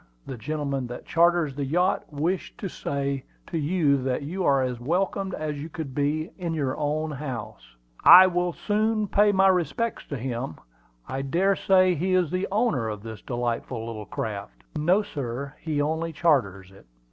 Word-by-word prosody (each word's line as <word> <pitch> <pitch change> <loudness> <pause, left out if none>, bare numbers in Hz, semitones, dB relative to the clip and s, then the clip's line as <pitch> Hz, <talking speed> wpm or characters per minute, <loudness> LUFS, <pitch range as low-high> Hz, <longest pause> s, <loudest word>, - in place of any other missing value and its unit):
The 135 - -6
gentleman 140 +1 -3
that 120 - -8
charters 170 -3 +3
the 140 +1 -3
yacht 175 +8 0
wished 165 +6 -2
me 210 - -5
to - - -10
say 140 -1 -2 0.2
to 165 - -3
you 150 -3 +2
that 130 +2 -1
you 180 +6 -3
are 135 -4 +3
as 125 -2 -3
welcome 190 +7 -1
as 150 -2 -3
you 155 - -6
could 155 -4 -6
be 150 +4 -1
in 170 -2 -2
your 140 -4 -1
own 155 +1 -1
house." 130 - -7 0.3
"I 185 +1 +11
will 180 -1 +1
soon 215 +2 0
pay 205 +2 +4
my 195 -1 +4
respects 190 +5 0
to 140 - -4
him. 120 -8 -4 0.5
I 135 - -3
dare 180 +8 +2
say 185 -1 +4
he 185 +3 0
is 180 -4 +2
the 185 +1 -1
owner 195 - +1
of 105 -1 -6
this 110 -1 -8
delightful 120 -1 -3
little 110 -3 -6
craft." 100 - -5
"No, 175 +7 +3
sir; 140 - -5
he 155 -2 -2
only 160 +3 -1
charters 105 - +1
her." 95 - -17
150 Hz, 180 wpm, -26 LUFS, 130-180 Hz, 0.5 s, I